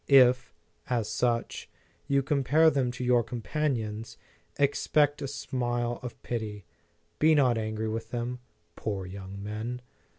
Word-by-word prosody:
If, 125 Hz, -5 st, +6 dB, 0.4 s
as 120 Hz, -4 st, 0 dB
such, 115 Hz, +2 st, -1 dB, 0.4 s
you 140 Hz, -1 st, +3 dB
compare 145 Hz, +3 st, +4 dB
them 135 Hz, -4 st, +1 dB
to 125 Hz, -, -5 dB
your 125 Hz, -1 st, +4 dB
companions, 115 Hz, -1 st, -2 dB, 0.4 s
ex 140 Hz, 0 st, +1 dB
pect 145 Hz, -1 st, +3 dB
a 140 Hz, -, -2 dB
smile 120 Hz, -3 st, -2 dB
of 125 Hz, -2 st, -7 dB
pity; 105 Hz, -5 st, -4 dB, 0.5 s
be 155 Hz, +1 st, +6 dB
not 130 Hz, -5 st, +4 dB
angry 110 Hz, 0 st, -2 dB
with 110 Hz, 0 st, -3 dB
them. 120 Hz, +1 st, -3 dB, 0.4 s
Poor 100 Hz, -3 st, -3 dB
young 95 Hz, +1 st, -8 dB
men! 110 Hz, +4 st, -4 dB
120 Hz, 135 wpm, -29 LUFS, 110-135 Hz, 0.5 s, If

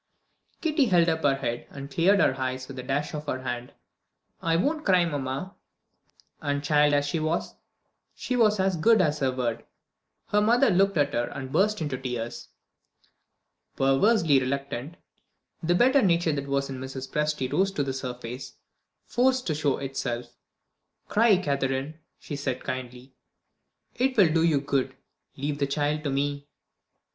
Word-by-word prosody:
Kitty 310 Hz, -4 st, +2 dB
held 175 Hz, -6 st, +4 dB
up 160 Hz, 0 st, -1 dB
her 140 Hz, -2 st, +3 dB
head, 120 Hz, -3 st, -4 dB
and 140 Hz, 0 st, -9 dB
cleared 190 Hz, +7 st, +3 dB
her 130 Hz, -, +3 dB
eyes 130 Hz, 0 st, -3 dB
with 135 Hz, -2 st, -8 dB
a -, -, -3 dB
dash 140 Hz, +3 st, -2 dB
of 150 Hz, -1 st, -6 dB
her 130 Hz, -2 st, -3 dB
hand. 125 Hz, -1 st, -4 dB, 0.7 s
"I 165 Hz, 0 st, +1 dB
won't 300 Hz, -, 0 dB
cry, 185 Hz, -3 st, +4 dB
mamma." 145 Hz, +4 st, -4 dB, 0.9 s
And 145 Hz, -2 st, -1 dB
child 150 Hz, 0 st, +4 dB
as 145 Hz, 0 st, +2 dB
she 150 Hz, +3 st, -1 dB
was, 155 Hz, +2 st, -1 dB, 0.6 s
she 250 Hz, -, -3 dB
was 215 Hz, -4 st, +3 dB
as 190 Hz, -1 st, +2 dB
good 220 Hz, +7 st, +4 dB
as 150 Hz, -4 st, +1 dB
her 135 Hz, -2 st, +1 dB
word. 120 Hz, -3 st, -2 dB, 0.7 s
Her 210 Hz, -, +3 dB
mother 240 Hz, +5 st, +4 dB
looked 195 Hz, 0 st, +3 dB
at 145 Hz, -1 st, +2 dB
her 120 Hz, 0 st, +1 dB
and 130 Hz, 0 st, -7 dB
burst 210 Hz, +4 st, +2 dB
into 135 Hz, -4 st, -3 dB
tears. 120 Hz, -3 st, -5 dB, 1.3 s
Perversely 145 Hz, +3 st, +3 dB
reluctant, 140 Hz, +2 st, -3 dB, 0.7 s
the 175 Hz, +1 st, +1 dB
better 260 Hz, +7 st, +5 dB
nature 170 Hz, -5 st, +2 dB
that 140 Hz, -1 st, -3 dB
was 140 Hz, 0 st, 0 dB
in 135 Hz, -1 st, -6 dB
Mrs. 130 Hz, 0 st, -6 dB
Presty 150 Hz, -3 st, -1 dB
rose 195 Hz, +1 st, +2 dB
to 145 Hz, -, 0 dB
the 135 Hz, -1 st, -3 dB
surface, 125 Hz, -1 st, -6 dB, 0.5 s
forced 255 Hz, +1 st, +1 dB
to 160 Hz, -, 0 dB
show 145 Hz, -2 st, 0 dB
itself. 125 Hz, -3 st, -4 dB, 0.7 s
"Cry, 220 Hz, -2 st, +4 dB
Catherine," 140 Hz, -1 st, -2 dB, 0.2 s
she 145 Hz, -, -7 dB
said 140 Hz, -3 st, -3 dB
kindly; 125 Hz, 0 st, -6 dB, 0.8 s
"it 260 Hz, 0 st, 0 dB
will 175 Hz, -7 st, +5 dB
do 165 Hz, -, +3 dB
you 160 Hz, -4 st, +3 dB
good. 135 Hz, -2 st, -1 dB, 0.4 s
Leave 145 Hz, +1 st, -3 dB
the 140 Hz, -, +1 dB
child 150 Hz, +2 st, -1 dB
to -, -, +1 dB
me." 140 Hz, +1 st, -2 dB
145 Hz, 160 wpm, -26 LUFS, 135-175 Hz, 1.3 s, better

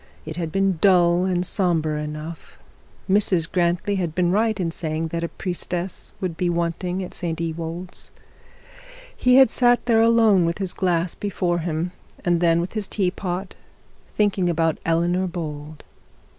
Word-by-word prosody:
It 155 Hz, 0 st, -6 dB
had 165 Hz, -2 st, -3 dB
been 195 Hz, -1 st, +1 dB
dull 180 Hz, -2 st, +4 dB
and 180 Hz, -1 st, 0 dB
sombre 160 Hz, -6 st, +1 dB
enough. 150 Hz, +2 st, -8 dB, 0.5 s
Mrs 190 Hz, -4 st, +2 dB
Grantly 175 Hz, +3 st, +1 dB
had 170 Hz, -4 st, -2 dB
been 175 Hz, -1 st, +2 dB
right 215 Hz, +1 st, +1 dB
in 170 Hz, -3 st, -1 dB
saying 160 Hz, 0 st, -3 dB
that 170 Hz, +1 st, -3 dB
a -, -, 0 dB
priestess 180 Hz, 0 st, -3 dB
would 180 Hz, -4 st, -3 dB
be 175 Hz, +1 st, 0 dB
wanting 175 Hz, +2 st, -2 dB
at 180 Hz, -, -8 dB
St 165 Hz, -2 st, -3 dB
Ewold's. 165 Hz, +2 st, -5 dB, 1.1 s
He 250 Hz, 0 st, +3 dB
had 265 Hz, -3 st, +7 dB
sat 245 Hz, -1 st, +3 dB
there 225 Hz, -2 st, +4 dB
alone 225 Hz, -5 st, +5 dB
with 170 Hz, 0 st, 0 dB
his 190 Hz, -3 st, -3 dB
glass 175 Hz, -2 st, 0 dB
before 180 Hz, -4 st, -1 dB
him, 165 Hz, +1 st, -2 dB, 0.3 s
and 175 Hz, -1 st, +2 dB
then 165 Hz, -1 st, +4 dB
with 175 Hz, +2 st, -3 dB
his 215 Hz, -3 st, -3 dB
teapot, 185 Hz, -1 st, -2 dB, 0.6 s
thinking 200 Hz, -4 st, +2 dB
about 165 Hz, -1 st, +1 dB
Eleanor 175 Hz, +3 st, +1 dB
Bold. 155 Hz, -3 st, -6 dB
175 Hz, 155 wpm, -23 LUFS, 165-190 Hz, 1.1 s, had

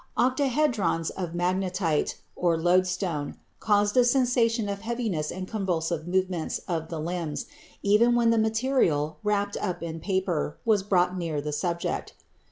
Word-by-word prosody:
Octahedrons 250 Hz, -, +1 dB
of 175 Hz, -3 st, -5 dB
magnetite 180 Hz, -2 st, 0 dB, 0.2 s
(loadstone) 175 Hz, -2 st, +1 dB, 0.2 s
caused 205 Hz, -1 st, +2 dB
a 250 Hz, -, +6 dB
sensation 240 Hz, -3 st, +2 dB
of 200 Hz, 0 st, -4 dB
heaviness 220 Hz, -9 st, -2 dB
and 185 Hz, 0 st, -5 dB
convulsive 170 Hz, -6 st, -2 dB
movements 185 Hz, -2 st, 0 dB
of 165 Hz, -3 st, -2 dB
the 165 Hz, -, -4 dB
limbs, 165 Hz, -1 st, -3 dB, 0.4 s
even 220 Hz, +4 st, +4 dB
when 235 Hz, -1 st, +4 dB
the 230 Hz, -, +3 dB
material, 220 Hz, -, +1 dB
wrapped 205 Hz, -1 st, 0 dB
up 180 Hz, -2 st, -3 dB
in 165 Hz, -1 st, -5 dB
paper, 185 Hz, -5 st, -1 dB
was 215 Hz, -3 st, +3 dB
brought 180 Hz, -2 st, +2 dB
near 165 Hz, -4 st, -2 dB
the 150 Hz, +1 st, -4 dB
subject. 170 Hz, +2 st, -2 dB
185 Hz, 135 wpm, -27 LUFS, 165-220 Hz, 0.4 s, a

